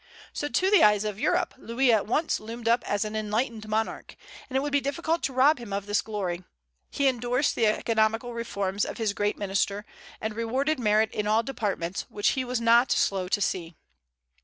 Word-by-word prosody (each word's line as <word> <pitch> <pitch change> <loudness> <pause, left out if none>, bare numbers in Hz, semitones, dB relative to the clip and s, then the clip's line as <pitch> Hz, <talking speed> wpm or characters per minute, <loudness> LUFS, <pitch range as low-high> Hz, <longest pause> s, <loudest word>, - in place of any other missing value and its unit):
So 290 - -2
to 375 +6 +1
the 415 - +6
eyes 210 -1 +5
of 210 -1 -4
Europe 360 +6 +1
Louis 245 +2 +1
at 210 -2 +1
once 305 +8 0
loomed 230 +2 -7
up 235 +1 +3
as 205 +1 0
an 215 0 -5
enlightened 215 +1 -2
monarch; 220 +1 -2 0.3
and 265 - -1
it - - +2
would 290 +1 -3
be 285 0 +2
difficult 325 +4 -1
to 270 - -1
rob 265 +4 +4
him 235 -4 -9
of 200 0 -2
this 205 0 +1
glory. 185 -5 -4 0.5
He 280 - -1
indorsed 250 +2 +1
the 225 - +2
economical 225 +2 +1
reforms 200 -4 -2
of - - -4
his 220 -3 0
great 205 0 -1
minister, 200 +1 -1 0.3
and 220 0 -4
rewarded 260 +6 0
merit 215 -1 +2
in 210 0 -2
all 220 +2 +3
departments, 200 -8 -3
which 205 - +1
he 260 - -1
was 250 -1 -2
not 235 +2 +4
slow 190 -2 +1
to 205 +2 0
see. 170 -4 -2
225 Hz, 200 wpm, -27 LUFS, 205-255 Hz, 0.5 s, the